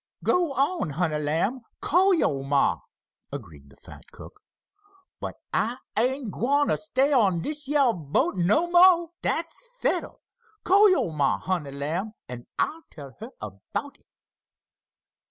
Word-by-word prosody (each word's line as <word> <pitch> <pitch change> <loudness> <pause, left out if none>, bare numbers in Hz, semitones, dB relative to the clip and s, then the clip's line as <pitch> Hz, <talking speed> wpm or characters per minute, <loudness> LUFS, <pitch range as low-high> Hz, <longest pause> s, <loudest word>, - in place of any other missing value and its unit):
"Go 345 -5 +1
on, 275 - 0
honey 155 0 -1
lamb, 165 - -1 0.2
call 375 +5 +3
yo' 140 - 0
ma," 140 +1 +1 0.5
agreed 80 - -10
the - - -18
fat - - -14
cook. - - -13 0.8
"But - - -5 0.2
I 235 +3 0 0.2
ain't 250 0 0
gwine 285 +7 +1
t' - - +3
stay 280 -1 +1
on 195 -10 +3
dish 300 -1 -2
yeah 280 -3 +3
boat 175 - 0
no 205 - +2
mo'! 350 -1 +6
Dat's 410 +10 -3
settled. - - -1 0.4
Call 405 +3 +6
yo' 365 - +1
ma, 145 -3 +1
honey 175 -7 -3
lamb, 155 +10 -4
an' 120 -1 -9
I'll 325 - -1
tell 140 -3 -11
her 225 +3 -8
about 105 - -7
it." - - -36
230 Hz, 140 wpm, -25 LUFS, -, 0.8 s, mo